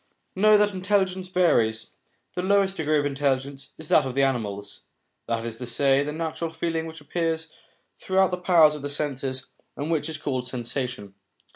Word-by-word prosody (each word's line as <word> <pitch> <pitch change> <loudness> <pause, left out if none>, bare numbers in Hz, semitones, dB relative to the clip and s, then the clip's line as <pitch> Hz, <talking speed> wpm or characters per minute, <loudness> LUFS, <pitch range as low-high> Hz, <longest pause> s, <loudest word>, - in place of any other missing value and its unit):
Know 210 +2 +6
that 205 0 +3
intelligence 190 -1 0
varies; 115 -12 +2 0.4
the 180 - -2
lowest 195 0 +2
degree 155 -1 +1
of 145 - +1
intelligence 140 -1 -2
is 155 - -7
that 150 - +5
of 130 -1 -4
the 140 - +3
animals, 105 -7 -2 0.4
that 115 0 -1
is 115 -1 -5
to 125 - -6
say, 135 +3 +3
the 150 - -3
natural 160 +1 -3
feeling 165 0 -2
which 160 -1 -9
appears 160 +1 -2 0.4
through 190 0 +2
the 180 - -2
powers 170 -4 +5
of 150 - -7
the 145 - -4
senses, 135 -3 -3 0.3
and 150 +3 -3
which 160 -1 0
is 155 - -4
called 130 -4 -3
sensation. 125 -4 -4
150 Hz, 175 wpm, -25 LUFS, 130-170 Hz, 0.4 s, Know